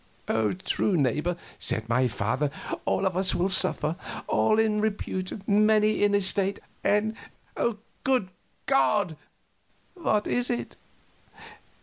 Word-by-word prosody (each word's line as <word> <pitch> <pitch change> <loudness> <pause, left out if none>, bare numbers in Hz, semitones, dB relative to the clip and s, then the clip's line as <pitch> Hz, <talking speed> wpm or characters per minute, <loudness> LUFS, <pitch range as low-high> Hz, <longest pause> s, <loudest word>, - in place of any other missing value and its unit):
"True, 195 -4 +1
neighbor," 150 +5 +1 0.2
said 110 0 -1
my 125 +2 +2
father; 125 +6 -1 0.4
"all 195 - +1
of 185 -2 0
us 185 0 +2
will 180 +2 +1
suffer 175 -4 +2 0.3
all 215 - +2
in 215 -1 +2
repute, 200 -2 -3
many 215 +1 +4
in 205 0 +4
estate. 200 0 +1 0.3
And, 215 +2 +2 0.9
good 255 -8 +1 0.4
God! 160 +6 +2 0.4
" - - -39
"What 215 - 0
is 245 0 0
it?" 240 - -3
195 Hz, 115 wpm, -27 LUFS, 165-215 Hz, 0.9 s, many